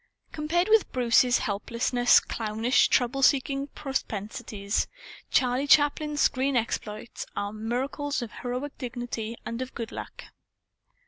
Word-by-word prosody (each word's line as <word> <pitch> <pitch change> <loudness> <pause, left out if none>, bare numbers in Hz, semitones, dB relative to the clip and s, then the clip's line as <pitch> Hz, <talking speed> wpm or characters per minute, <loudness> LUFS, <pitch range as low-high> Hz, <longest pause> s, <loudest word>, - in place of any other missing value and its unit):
Compared 330 +4 0
with 440 -1 +4
Bruce's 245 0 +4
helplessly 235 +4 -2 0.2
clownish 225 +3 +2
trouble 250 +2 +1
seeking 275 0 +2
propensities, 210 -7 -3 0.4
Charlie 255 +2 +2
Chaplin's 295 0 +3
screen 270 0 +2
exploits 220 -1 -4
are 205 +1 -3
miracles 260 +5 -2
of 230 - -7
heroic 250 +4 -4
dignity 240 -3 -5
and 230 +2 -4
of 255 0 -6
good 230 -1 -5
luck. - - -8
250 Hz, 115 wpm, -27 LUFS, 230-280 Hz, 0.4 s, with